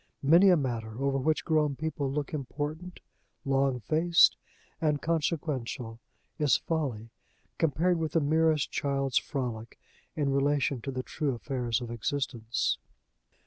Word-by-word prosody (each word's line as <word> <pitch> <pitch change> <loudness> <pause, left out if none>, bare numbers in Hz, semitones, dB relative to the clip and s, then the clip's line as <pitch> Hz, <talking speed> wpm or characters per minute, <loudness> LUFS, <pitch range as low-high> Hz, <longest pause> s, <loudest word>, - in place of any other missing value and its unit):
Many 170 +8 +6
a 180 - +6
matter, 115 -5 -3
over 135 0 +1
which 155 +4 0
grown 150 -3 +2
people 150 -2 -3
look 145 +2 -3
important, 150 +5 -5 0.4
long 135 -2 +1
faced, 165 +8 +4 0.5
and 150 -2 +1
consequential, 140 -8 -2 0.4
is 145 -5 +4
folly, 130 -9 -3 0.5
compared 165 +3 +2
with 160 -2 -2
the 165 - +4
merest 155 0 +2
child's 135 -2 0
frolic, 120 -5 -5 0.4
in 145 -2 0
relation 140 -2 +1
to 135 - -4
the 130 -1 -4
true 140 -2 -2
affairs 120 -2 -2
of 120 -1 -6
existence. 115 - -1
140 Hz, 130 wpm, -29 LUFS, 125-155 Hz, 0.5 s, Many